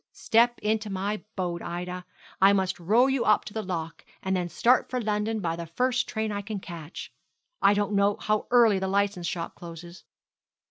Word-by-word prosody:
Step 240 +1 +3
into 215 0 0
my 200 +2 -2
boat, 175 -3 -2
Ida; 180 +1 -5 0.4
I 195 +1 +7
must 190 -2 0
row 215 +9 +4
you 265 -2 +1
up 215 - +3
to 205 - -8
the 220 - -2
lock, 165 -4 -5 0.2
and 190 0 0
then 180 -1 -1
start 240 +9 +3
for 255 - -1
London 215 0 -1
by 165 -2 -1
the 170 0 -6
first 250 +9 0
train 220 -1 -2
I 205 0 -3
can 205 0 -5
catch. 170 -3 -9 0.5
I 200 - +5
don't 205 +1 0
know 200 0 +3
how 215 0 0
early 230 -5 +5
the 190 - -2
licence 195 -2 0
shop 170 -2 -4
closes.' 170 +1 -11
200 Hz, 190 wpm, -27 LUFS, 180-220 Hz, 0.5 s, I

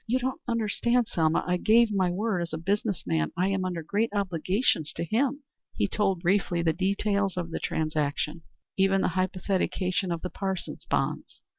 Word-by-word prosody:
"You 245 +3 +2
don't 260 0 -3
understand, 235 +1 +1
Selma. 160 -1 +1
I 180 0 +1
gave 225 +4 +4
my 190 -3 +2
word 190 +1 -1
as 170 -1 -4
a - - -1
business 200 +4 -1
man. 80 -3 0
I 185 +2 +2
am 195 -1 0
under 175 -3 -3
great 210 +7 0
obligations 185 - +1
to - - -3
him." 270 - 0 0.3
He - - +1
told 195 -4 0
briefly 175 -2 +1
the 160 -1 +2
details 200 +1 0
of 170 -2 -3
the - - -3
transaction; 155 0 -1 0.4
even 195 0 +3
the - - +2
hypothecation 185 +1 -1
of 170 -1 -3
the 180 - -4
Parsons 190 -2 -4
bonds. - - -2
190 Hz, 175 wpm, -27 LUFS, 170-210 Hz, 0.4 s, gave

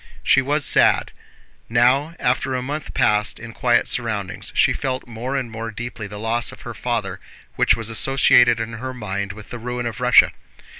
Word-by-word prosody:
She 135 - +4
was 145 +2 0
sad. - - +3 0.6
Now, 130 +7 +2
after 130 +1 0
a 125 - -2
month 145 +3 -5
passed 105 0 +2
in 120 -1 -9
quiet 120 -2 +2
surroundings, 105 -6 -3
she - - +4
felt 130 -2 -3
more 120 +3 -5
and 130 -4 -3
more 115 0 -5
deeply 115 -1 -6
the 105 +1 -9
loss 115 +2 -1
of - - -14
her - - -7
father - - -3 0.4
which - - +3
was 115 0 -2
associated 120 -1 +4
in 115 0 -4
her 130 0 -5
mind 100 -3 -4
with 105 0 -12
the 120 - -6
ruin 125 +1 -4
of 115 -2 -5
Russia. 125 0 +5
120 Hz, 185 wpm, -21 LUFS, 110-130 Hz, 0.6 s, Russia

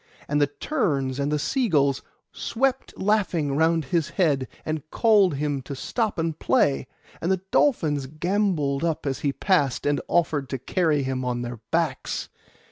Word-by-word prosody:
And 145 0 +1
the 145 - +4
terns 140 - -1
and 140 +1 0
the 150 - +2
sea 235 - 0
gulls 140 -4 +2 0.3
swept 265 +2 -1
laughing 185 -8 +1
round 160 0 +2
his 165 +2 0
head, 145 -8 +1 0.2
and 155 0 -4
called 205 -6 +4
to - - -4
him 145 -1 -1
to 140 +2 -7
stop 220 - -2
and 165 -1 -2
play, 140 - +2 0.3
and 170 - 0
the 190 -1 0
dolphins 150 - +2
gambolled 155 -3 0
up 165 -3 -1
as 135 -2 -1
he 140 - 0
passed, 145 -5 +1
and 145 0 +1
offered 155 -5 +1
to 135 - -2
carry 150 +2 +1
him 130 -1 -2
on 120 -1 -2
their 120 -1 -6
backs. 165 -5 -1
150 Hz, 170 wpm, -25 LUFS, 140-180 Hz, 0.3 s, the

